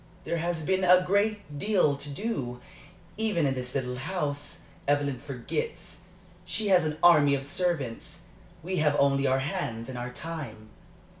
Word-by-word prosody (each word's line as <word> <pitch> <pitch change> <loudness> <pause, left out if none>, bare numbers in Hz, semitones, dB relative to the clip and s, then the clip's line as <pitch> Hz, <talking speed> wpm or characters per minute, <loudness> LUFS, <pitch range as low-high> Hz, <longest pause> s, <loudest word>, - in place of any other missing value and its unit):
"There 170 - -1
has 165 -1 -2
been 190 +4 +1
a 180 0 +6
great 200 -5 0
deal 190 -8 +3
to 140 +1 -6
do, 140 - -3 0.6
even 215 -8 +1
in 135 - +2
this 125 0 -4
little 125 -2 -2
house. 145 -1 -3 0.3
Evelyn 145 -2 +1
forgets; 140 - -5 0.4
she 215 -2 -1
has 180 -4 +5
an 155 0 -3
army 150 -5 +7
of 135 0 -4
servants; 145 -7 -2 0.4
we 185 +2 -2
have 150 -2 +3
only 140 -1 +3
our 130 0 +3
hands 115 -4 -3
and 125 -2 -5
our 120 +1 -4
time." 125 -9 -7
145 Hz, 155 wpm, -28 LUFS, 135-180 Hz, 0.6 s, army